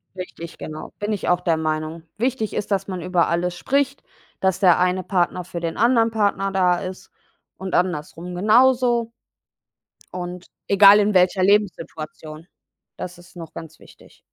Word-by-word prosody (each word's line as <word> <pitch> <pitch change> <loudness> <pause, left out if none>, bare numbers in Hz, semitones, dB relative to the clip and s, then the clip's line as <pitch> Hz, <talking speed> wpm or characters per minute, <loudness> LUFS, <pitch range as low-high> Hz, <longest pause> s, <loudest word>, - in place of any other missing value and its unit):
Richtig, 170 -2 -8
genau. 155 0 -8
Bin 205 +1 -2
ich 205 - -3
auch 180 0 +2
der 165 -2 +1
Meinung. 155 +1 -3
Wichtig 235 -2 -1
ist, 205 - -4
dass 195 0 0
man 185 -2 -5
über 180 0 +1
alles 175 +1 -1
spricht, 280 +5 -1 0.4
dass 190 -1 +1
der 180 -4 +5
eine 180 +1 +1
Partner 180 -1 0
für 170 0 -6
den 165 -1 -4
anderen 230 -1 +3
Partner 200 -2 0
da 180 -2 +2
ist 185 0 -8 0.5
und 190 0 -6
andersrum 175 0 -2
genauso. 240 +3 +3 1.0
Und 180 0 -6 0.2
egal 200 +1 +7
in 210 0 +2
welcher 185 0 +3
Lebenssituation, 165 -5 -1 0.5
das 180 -1 -7
ist 175 +1 -18
noch 165 -2 -9
ganz 160 -1 -10
wichtig. - - -19
185 Hz, 155 wpm, -22 LUFS, 170-205 Hz, 1.0 s, egal